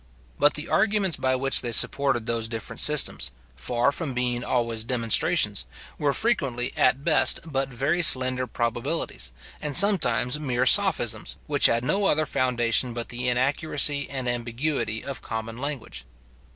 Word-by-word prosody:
But 145 +1 +4
the 150 +2 -3
arguments 200 -4 0
by 130 0 -1
which 135 +1 +3
they 120 - -4
supported 135 0 +2
those 115 -1 -2
different 115 -1 -7
systems, 150 -1 +3 0.3
far 120 - -1
from 140 -4 -3
being 125 -1 -2
always 115 -3 -2
demonstrations, 115 -2 +1 0.3
were 145 -2 +1
frequently 140 - -1
at 130 +2 +1
best 155 -1 +3
but 135 -4 -3
very 135 +7 -1
slender 130 -4 +4
probabilities, 120 - -4 0.3
and 150 -2 +1
sometimes 150 - +3
mere 130 -4 -1
sophisms, 185 - +3
which - - +3
had 115 +1 -1
no 195 +10 -1
other 155 +1 +1
foundation 120 -2 0
but 120 -1 -5
the 125 +1 -3
inaccuracy 140 +3 0
and 130 -2 -5
ambiguity 120 -1 -3
of 140 -1 -6
common 110 +1 -7
language. 130 - -6
130 Hz, 145 wpm, -24 LUFS, 120-145 Hz, 0.3 s, But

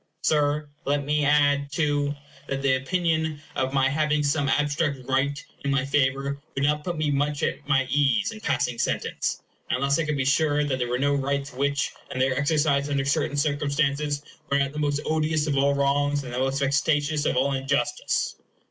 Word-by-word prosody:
Sir, 150 0 +1 0.2
let 140 0 0
me 150 +1 +1
add, 145 -1 +3
too, 145 -1 0 0.3
that 135 0 -3
the 135 -1 +3
opinion 160 +2 0 0.2
of 130 0 0
my 135 -1 +3
having 150 +1 +1
some 145 0 +1
abstract 145 0 +1
right 135 +2 +1 0.3
in 140 - -1
my 135 -1 +1
favor 140 0 0
would 135 - -1
not 150 +1 +1
put 175 0 -3
me 155 -1 0
much 145 +2 0
at 145 - -2
my 135 -2 +3
ease 145 - +2
in 220 - -9
passing 125 - -1
sentence, - - -2 0.3
unless 140 +4 +1
I 165 - 0
could 150 -1 -1
be 135 - 0
sure 150 +1 +2
that 135 -3 -1
there 120 -1 -1
were 125 - 0
no 140 +2 +1
rights 140 0 -1
which, 140 +2 0 0.2
in - - -5
their 130 0 +2
exercise 145 0 +1
under 140 -1 0
certain 140 +1 0
circumstances, 145 0 0 0.3
were 140 - +3
not 140 0 0
the 150 - -4
most 145 -1 0
odious 155 -1 +1
of 145 -2 0
all 140 +1 +3
wrongs 145 +1 +1
and 125 -2 -7
the 125 - -2
most 135 +1 0
vexatious 145 +2 +1
of - - 0
all 140 +2 +2
injustice. 135 - -1
145 Hz, 190 wpm, -25 LUFS, 140-150 Hz, 0.3 s, add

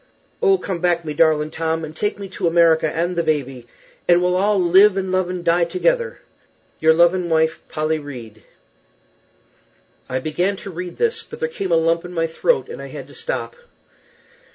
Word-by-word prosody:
O 390 -4 +4
come 190 - -4
back 175 -1 0
my 150 - -3
Darlin 155 -1 +2
tom 160 0 -2
and 155 0 -11
take 205 +5 -2
me 200 -1 -7
to 185 -1 -2
America 165 -1 +4
an 170 +2 -1
the 170 - 0
baby 135 -6 -2 0.4
an 175 0 +5
weel 180 0 +1
all 200 +2 +2
live 190 +3 +5
an 190 -1 -2
love 185 -1 0
an 180 -1 -4
di 170 0 +3
together 475 - 0 0.6
"Your 160 0 +5
loving 175 +2 +3
wife 160 0 +1
Polley 155 0 -1
Reed." 115 -6 -10 1.7
I 130 - -1
began 165 +8 -1
to 195 0 -9
read 180 +1 -7
this, 460 -1 0
but - - -11
there 475 - 0
came 195 - -4
a - - +5
lump 165 +1 +2
in 180 0 -9
my 165 -1 0
throat, 460 - 0
and 465 - -8
I - - -7
had - - -9
to - - -14
stop. 470 +1 -4
175 Hz, 190 wpm, -20 LUFS, 160-195 Hz, 1.7 s, an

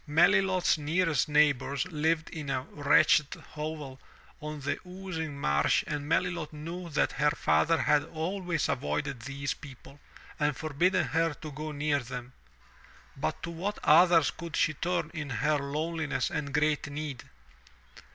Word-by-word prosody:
Melilot's 185 +2 +3
nearest 160 -1 +1
neighbors 145 -1 +2
lived 160 +1 0
in 150 -3 -6
a 130 -1 -1
wretched 145 +1 +4 0.2
hovel 150 -3 -6 0.4
on 150 0 -5
the 140 - -2
oozing 180 -6 -6
marsh 70 - +2
and 145 0 -4
Melilot 170 -1 0
knew 170 +4 -7
that 150 - +1
her 150 0 +2
father 165 +2 +2
had 145 -1 +3
always 170 0 -2
avoided 140 0 -2
these 140 +3 -3
people, 140 0 -13 0.4
and 150 -1 +1
forbidden 170 +5 +1
her 165 -1 +1
to 155 - -8
go 155 +2 -5
near 145 0 0
them. 125 0 -7 0.8
But 80 - -3
to 170 - -4
what 190 +5 -3
others 165 0 +6
could 170 -2 -7
she 155 - +2
turn 165 +1 -2
in 150 -3 -5
her 145 +5 +1
loneliness 150 -1 -2
and 140 -2 -3
great 150 0 +1
need? 145 -3 -5
150 Hz, 140 wpm, -29 LUFS, 145-165 Hz, 0.8 s, others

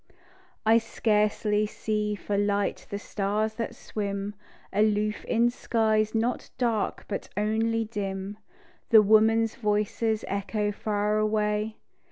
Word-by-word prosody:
I 225 +1 +6
scarcely 210 -1 +1
see 210 0 -2
for 205 0 -3
light 205 0 0
the 200 - -3
stars 210 +1 -1
that 230 - -3
swim 200 -1 -4 0.4
Aloof 210 +1 +1
in 235 +1 +2
skies 220 -2 +1
not 235 +2 -1
dark 235 -4 -1
but 200 - -4
only 225 +2 +1
dim. 200 -1 -4 0.5
The 220 -3 +8
women's 220 +1 +4
voices 215 0 0
echo 200 +1 -1
far 210 0 0
away. 215 0 0
215 Hz, 115 wpm, -27 LUFS, 205-220 Hz, 0.5 s, The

